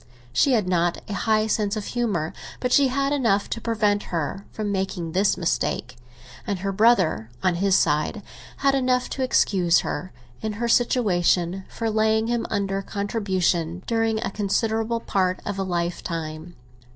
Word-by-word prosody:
She 265 - +3
had 215 -6 +2
not 175 -1 +1
a 210 - -4
high 215 +1 +2
sense 210 -1 0
of 210 -2 -4
humour, 205 -10 -1 0.3
but 250 - -1
she 280 -1 +6
had 275 +2 0
enough 225 -8 +2
to 230 - -3
prevent 210 -3 +1
her 170 +4 -3
from 210 -2 -3
making 190 -4 -2
this 195 +4 +2
mistake; 160 -6 -1 0.5
and 200 -2 -1
her 195 +2 -2
brother, 190 - +3
on 185 - +3
his 190 +2 +3
side, 150 +8 +1 0.4
had 275 - +5
enough 255 -2 +1
to 270 - -3
excuse 185 -9 +3
her, 185 - -4 0.3
in 220 -1 -2
her 235 +3 -2
situation, 190 -6 +2
for 230 - -3
laying 220 +1 +2
him 235 0 -1
under 195 -1 -1
contribution 190 -5 -1
during 225 -1 +1
a - - -2
considerable 220 +3 0
part 185 -3 0
of 200 -1 -3
a - - +1
lifetime. 170 -2 -4
200 Hz, 160 wpm, -24 LUFS, 180-225 Hz, 0.5 s, she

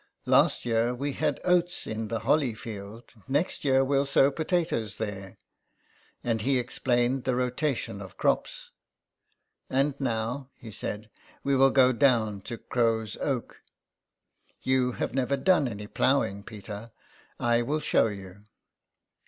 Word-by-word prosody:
'' - - -47
Last - - +4
year 120 +1 +1
we 140 +3 -3
had 150 -1 -1
oats 175 -1 +2
in 110 0 -4
the 115 0 -3
Holly 125 0 +2
field; 110 +1 -9
next 145 +6 0
year 135 -2 +4
you'll 140 +1 +1
sow 140 0 +4
potatoes 160 - -1
there." 100 -3 -5 0.9
And 115 -2 0
he 135 +4 +2
explained 120 +1 0
the 130 - 0
rotation 125 -4 -1
of 95 -2 -10
crops. - - -1 0.5
" - - -46 0.3
And, 140 +2 +2
now," 125 +1 -2
he 115 - -11
said, 110 +1 -5 0.2
" - - -27
we 140 0 +2
will 135 +1 +6
go 130 -1 +5
down 115 -6 +2
to 115 - -4
Crow's 115 -3 0
Oak. 135 -5 -3 1.0
You 130 -1 +2
have - - -3
never 135 +1 0
done 165 -2 +3
any 105 -3 -6
ploughing, 105 -3 +1
Peter; 105 +1 -9 0.5
I 120 0 +2
will 145 +6 -1
show 140 -5 +3
you." 100 -1 -9
120 Hz, 145 wpm, -28 LUFS, 110-135 Hz, 1.0 s, will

